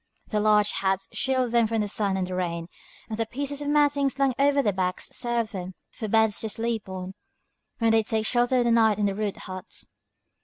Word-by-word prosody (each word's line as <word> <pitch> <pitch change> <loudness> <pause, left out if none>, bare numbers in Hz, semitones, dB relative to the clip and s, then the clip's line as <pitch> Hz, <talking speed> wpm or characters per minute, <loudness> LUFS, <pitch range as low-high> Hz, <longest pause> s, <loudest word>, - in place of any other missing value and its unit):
Their 210 - 0
large 210 -1 +4
hats 190 0 -1
shield 260 -2 0
them 235 -1 +3
from 225 0 0
the 210 - -1
sun 200 -1 0
and 185 - -1
the 185 - -6
rain, 170 -2 -3 0.4
and 220 0 -5
the 225 - 0
pieces 285 +3 -4
of 290 - -4
matting 290 -1 +3
slung 270 -1 +1
over 280 0 +3
their 205 - +1
backs 185 -1 -2
serve 235 -2 -1
them 185 -2 -6 0.2
for 220 - -5
beds 220 0 +3
to 220 - -3
sleep 225 -2 -2
on, 185 0 -6 0.6
when 230 -1 +2
they 225 0 +5
take 220 0 -1
shelter 245 +2 +2
for 245 - +3
the 235 - +2
night 220 -3 +4
in 205 -2 0
rude 210 -1 -2
huts. 185 0 -6
220 Hz, 215 wpm, -26 LUFS, 195-245 Hz, 0.6 s, they